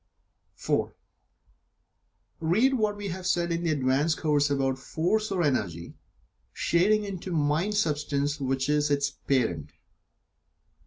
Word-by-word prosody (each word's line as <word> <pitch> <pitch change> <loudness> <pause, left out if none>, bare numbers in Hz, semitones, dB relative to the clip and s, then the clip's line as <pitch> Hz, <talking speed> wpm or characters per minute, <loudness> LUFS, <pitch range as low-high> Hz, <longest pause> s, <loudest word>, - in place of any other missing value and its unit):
(4) - - -1 1.4
Read 210 +12 +3
what 215 -4 0
we 205 -1 -5
have 185 +1 -4
said 170 -1 +1
in 170 0 -1
the 170 - 0
"Advanced 145 +2 +1
Course" 145 -2 +2
about 135 -2 0
Force 200 +10 -1
or 185 -3 +1
Energy, 95 - -1 0.6
shading 210 +5 +2
into 190 -2 -6
Mind 160 +6 +1
substance 150 -5 0
which 135 -1 -1
is 150 0 +2
its 140 -1 +1
parent. 110 - -1
150 Hz, 120 wpm, -27 LUFS, 140-185 Hz, 1.4 s, Read